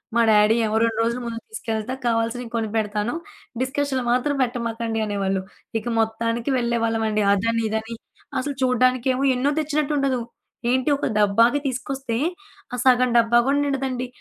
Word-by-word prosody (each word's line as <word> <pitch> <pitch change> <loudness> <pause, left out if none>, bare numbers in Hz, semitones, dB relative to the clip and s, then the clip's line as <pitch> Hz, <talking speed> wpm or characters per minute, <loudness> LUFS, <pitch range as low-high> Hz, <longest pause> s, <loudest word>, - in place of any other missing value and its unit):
మా 235 - +5
డ్యాడీ 210 +1 +5
ఏమో, 215 0 -1
"2 230 -1 0
రోజులు 235 +2 -1
ముందు 230 -1 -4
తీసుకెళ్తా 225 - -3
కావాల్సినవి 230 +1 0
కొనిపెడతాను. 215 -1 -1 0.5
డిస్కషన్లు 265 0 -1
మాత్రం 255 +4 +1
పెట్టమాకండి" 230 -2 -2
అనేవాళ్ళు. 195 -2 -1 0.4
ఇక - - -14
మొత్తానికి 230 +2 -1
వెళ్ళేవాళ్ళం 230 -2 0
అండి 215 0 +1
అదని, 230 +3 +1
ఇదని. 220 +1 -3 0.4
అసలు 280 +2 -3
చూడ్డానికేమో 255 +1 +2
ఎన్నో 260 +3 +1
తెచ్చినట్టు 300 -1 0
ఉండదు. 270 -3 +1 0.5
ఏంటి 260 +3 +1
ఒక - - -2
డబ్బాకి 230 +6 +4
తీసుకొస్తే. 265 -1 -3 0.6
ఆ - - 0
సగం 255 -1 +5
డబ్బా 235 0 +4
కూడా 280 +1 +3
నిండదండి. 265 -3 -2
235 Hz, 140 wpm, -23 LUFS, 225-260 Hz, 0.6 s, మా